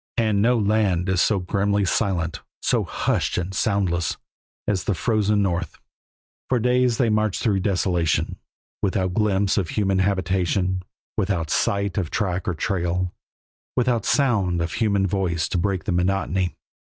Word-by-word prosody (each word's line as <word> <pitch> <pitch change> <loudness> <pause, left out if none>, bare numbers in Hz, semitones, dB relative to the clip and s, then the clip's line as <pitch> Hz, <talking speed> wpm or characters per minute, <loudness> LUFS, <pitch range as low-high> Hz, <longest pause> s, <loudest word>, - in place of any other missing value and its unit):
And 110 -4 +2
no 120 +3 +3
land 100 -4 +1
is 95 -2 +2
so 105 - +3
grimly 100 +2 0
silent, 85 -5 0 0.2
so - - +1
hushed - - -1
and 90 +2 -2
soundless, 90 -6 0 0.5
as 100 -3 0
the 100 - 0
frozen 105 -1 +1
North. 85 -4 -2 0.7
For 130 - +3
days 125 0 +2
they 120 -4 +2
marched 110 -2 0
through 105 -5 +2
desolation, 90 -4 0 0.4
without 95 -2 0
glimpse 100 -1 +2
of 90 -5 -2
human 95 -1 +1
habitation, 95 -1 0 0.4
without 95 -6 -1
sight 100 0 +1
of 85 -5 -2
track 95 -4 -2
or 90 - 0
trail, 90 0 -1 0.6
without 120 -3 +1
sound 105 -11 +2
of 85 -1 -2
a - - -5
human 100 -3 +2
voice 90 -4 0
to 90 - 0
break 95 0 -1
the - - -2
monotony. 90 0 0
95 Hz, 150 wpm, -23 LUFS, 90-105 Hz, 0.7 s, no